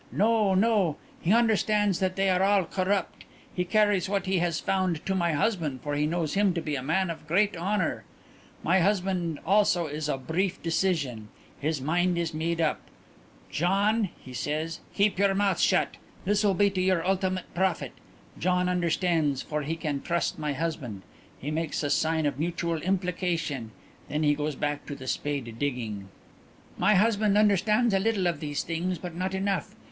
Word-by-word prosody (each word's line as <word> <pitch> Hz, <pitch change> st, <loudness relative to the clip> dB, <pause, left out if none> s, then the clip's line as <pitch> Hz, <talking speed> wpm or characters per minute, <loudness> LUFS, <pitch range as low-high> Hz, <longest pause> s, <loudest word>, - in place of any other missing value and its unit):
No, 215 Hz, -2 st, +3 dB
no; 195 Hz, -6 st, +2 dB, 0.2 s
he 170 Hz, -, +1 dB
understands 210 Hz, -3 st, +3 dB
that 185 Hz, -1 st, 0 dB
they 195 Hz, 0 st, +1 dB
are 180 Hz, 0 st, +2 dB
all 195 Hz, 0 st, +4 dB
corrupt. 190 Hz, +3 st, -1 dB, 0.3 s
He 180 Hz, -, 0 dB
carries 205 Hz, -1 st, +2 dB
what 200 Hz, -1 st, 0 dB
he 190 Hz, -1 st, +1 dB
has 170 Hz, -2 st, 0 dB
found 185 Hz, -4 st, -1 dB
to 195 Hz, -, 0 dB
my 170 Hz, -3 st, +1 dB
husband 150 Hz, -, 0 dB
for 145 Hz, -, -3 dB
he 150 Hz, +1 st, +1 dB
knows 165 Hz, -2 st, -1 dB
him 195 Hz, -2 st, +2 dB
to -, -, 0 dB
be 150 Hz, -2 st, -2 dB
a 135 Hz, -, -3 dB
man 170 Hz, +6 st, 0 dB
of 160 Hz, -2 st, -9 dB
great 195 Hz, +5 st, +2 dB
honour. 185 Hz, +1 st, -1 dB, 0.6 s
"My 185 Hz, +4 st, +3 dB
husband 180 Hz, -4 st, 0 dB
also 190 Hz, -2 st, +3 dB
is 150 Hz, 0 st, -4 dB
of 135 Hz, -2 st, -3 dB
brief 180 Hz, +3 st, -1 dB
decision. 160 Hz, -, 0 dB, 0.3 s
His 155 Hz, 0 st, -1 dB
mind 175 Hz, +5 st, +1 dB
is 170 Hz, -1 st, -1 dB
made 165 Hz, +2 st, -1 dB
up. 160 Hz, -2 st, +1 dB, 0.7 s
'Gian,' 200 Hz, +5 st, +2 dB
he 130 Hz, -, -12 dB
says, 150 Hz, +6 st, -3 dB, 0.2 s
'keep 200 Hz, -1 st, +2 dB
your 200 Hz, -1 st, +3 dB
mouth 195 Hz, -2 st, +1 dB
shut. -, -, +2 dB, 0.3 s
This 205 Hz, +2 st, +2 dB
will 200 Hz, -2 st, +3 dB
be 200 Hz, +1 st, +3 dB
to 190 Hz, -1 st, -1 dB
your 185 Hz, -2 st, +1 dB
ultimate 185 Hz, -1 st, -1 dB
profit.' 190 Hz, 0 st, 0 dB, 0.5 s
Gian 180 Hz, +1 st, +1 dB
understands, 170 Hz, -5 st, +1 dB
for 150 Hz, 0 st, -3 dB
he 155 Hz, +3 st, -2 dB
can 150 Hz, -4 st, -3 dB
trust 170 Hz, -2 st, -1 dB
my 150 Hz, -1 st, -1 dB
husband. 140 Hz, -, -4 dB, 0.3 s
He 145 Hz, -, -5 dB
makes 160 Hz, 0 st, -2 dB
a 145 Hz, -, 0 dB
sign 160 Hz, 0 st, +1 dB
of 145 Hz, -2 st, -1 dB
mutual 165 Hz, 0 st, -1 dB
implication. 175 Hz, -, -1 dB, 0.4 s
Then 150 Hz, +1 st, -1 dB
he 145 Hz, -1 st, +4 dB
goes 150 Hz, 0 st, -2 dB
back 145 Hz, +1 st, -3 dB
to 145 Hz, -, -5 dB
the 130 Hz, -, -10 dB
spade 130 Hz, -4 st, -3 dB
digging. 115 Hz, -8 st, -3 dB, 0.7 s
"My 210 Hz, -, +3 dB
husband 210 Hz, 0 st, +3 dB
understands 210 Hz, +3 st, +3 dB
a 195 Hz, -, +3 dB
little 205 Hz, -2 st, +1 dB
of 170 Hz, -4 st, 0 dB
these 145 Hz, -1 st, -3 dB
things 175 Hz, +2 st, -2 dB
but 175 Hz, +1 st, -7 dB
not 185 Hz, +2 st, -2 dB
enough. 195 Hz, +1 st, -2 dB
175 Hz, 180 wpm, -27 LUFS, 155-195 Hz, 0.7 s, all